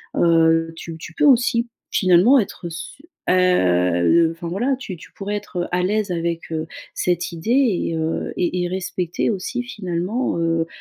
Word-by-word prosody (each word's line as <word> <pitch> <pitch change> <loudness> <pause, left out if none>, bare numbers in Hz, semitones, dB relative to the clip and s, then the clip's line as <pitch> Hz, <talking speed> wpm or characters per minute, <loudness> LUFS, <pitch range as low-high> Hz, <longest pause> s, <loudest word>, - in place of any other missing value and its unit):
heu, 165 -1 +3
tu 165 0 -8
tu 165 - -9
peux - - +2
aussi 240 -3 +4 0.2
finalement 185 +8 +5
être 195 -4 -4
s 170 +10 -8 0.3
heu, 95 - +3
enfin 165 +1 -7
voilà 240 +10 0
tu 210 -8 -7
tu 165 - -14
pourrais 205 +1 -4
être 185 -4 -4
à 180 0 +1
l'aise 205 +1 0
avec, 170 -1 -3
heu, 160 0 -3 0.3
cette 175 -1 -1
idée 170 +6 -6
et 240 -10 +2
heu, 160 0 -2
et 180 0 0
et - - 0
respecter 180 +1 -2
aussi 225 +5 -3
finalement, 195 +1 -2
heu 165 0 0
175 Hz, 160 wpm, -21 LUFS, 165-205 Hz, 0.3 s, finalement